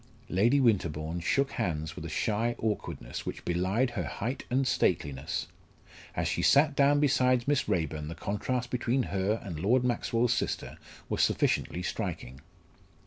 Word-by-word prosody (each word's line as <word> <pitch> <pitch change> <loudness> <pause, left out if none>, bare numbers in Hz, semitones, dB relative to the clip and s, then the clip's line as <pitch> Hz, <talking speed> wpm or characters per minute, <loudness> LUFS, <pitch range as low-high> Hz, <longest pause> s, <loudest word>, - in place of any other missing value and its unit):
Lady 115 +10 +3
Winterbourne 85 - +1
shook 135 +11 +1
hands 80 -3 -2
with - - -7
a - - -5
shy 115 +3 0
awkwardness 105 - -3
which - - -6
belied 95 +9 +1
her - - -3
height 125 +6 -4
and 130 +1 +1
stateliness. 70 - 0 0.7
As - - 0
she - - -1
sat 140 - +5
down 145 +1 +4
beside 130 -3 +3
Miss 145 -6 +1
Raeburn 80 -5 -1
the 80 - -6
contrast 120 +7 -2
between 125 +1 +1
her 100 +3 +1
and 85 -6 -6
Lord 120 +9 +3
Maxwell's 120 -1 +1
sister - - -3 0.3
was - - 0
sufficiently 90 - +1
striking. 65 -6 -4
110 Hz, 145 wpm, -29 LUFS, 85-125 Hz, 0.7 s, sat